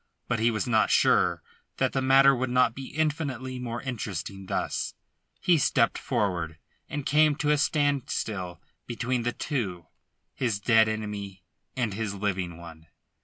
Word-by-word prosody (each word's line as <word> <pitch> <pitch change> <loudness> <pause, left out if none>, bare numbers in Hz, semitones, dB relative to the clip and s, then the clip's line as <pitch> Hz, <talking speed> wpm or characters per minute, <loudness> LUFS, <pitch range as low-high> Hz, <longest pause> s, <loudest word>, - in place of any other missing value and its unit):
But 120 -2 0
he 115 +2 +3
was 110 -2 -1
not 110 -3 +3
sure - - +3 0.3
that - - +1
the 135 - +1
matter 135 +1 +6
would 130 0 -1
not 125 -2 +3
be 130 +1 -7
infinitely 140 -5 -2
more 120 -1 -4
interesting 100 - -5
thus. - - -2 0.4
He 175 -3 +3
stepped - - +3
forward, 85 -6 -1 0.3
and 145 -1 -4
came 150 0 +4
to 150 0 +1
a 150 - +4
standstill 130 - -1 0.3
beside 120 0 -2
the 120 - +1
two 100 - -3 0.5
his 115 -6 -1
dead 110 +1 +4
enemy 105 -3 -5 0.3
and 120 -5 -1
his 105 -1 -3
living 95 -4 -2
one. 80 -1 -12
115 Hz, 150 wpm, -27 LUFS, 100-135 Hz, 0.5 s, matter